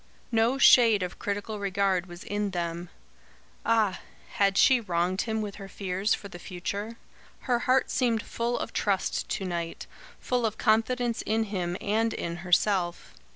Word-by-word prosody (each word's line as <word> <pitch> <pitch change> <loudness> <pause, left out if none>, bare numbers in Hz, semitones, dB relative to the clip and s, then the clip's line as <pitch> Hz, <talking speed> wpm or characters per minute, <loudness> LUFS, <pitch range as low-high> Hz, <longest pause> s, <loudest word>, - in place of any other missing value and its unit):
No 230 +3 +2
shade 230 -7 +6
of 180 - -6
critical 205 +1 -3
regard 195 -2 0
was 175 0 -10
in 205 0 -2
them. 170 -1 -4 0.7
Ah! 220 -5 +2 0.3
had 195 -1 +2
she 260 -2 +6
wronged 180 -1 0
him 220 -1 -2
with 205 -1 -6
her 195 -1 -9
fears 195 +2 -1
for 200 - -10
the 175 -2 -10
future? 200 +6 -5 0.4
Her 245 -3 +1
heart 255 +1 +2
seemed 235 -4 +1
full 235 +1 -2
of - - -5
trust 195 -3 -1
to 195 - -2
night, 170 -2 -4 0.3
full 250 -1 -1
of 215 0 -6
confidence 230 +1 +1
in 220 +1 0
him 175 -2 -2
and 225 +2 0
in 170 0 -4
herself. 180 0 0
200 Hz, 155 wpm, -27 LUFS, 180-225 Hz, 0.7 s, shade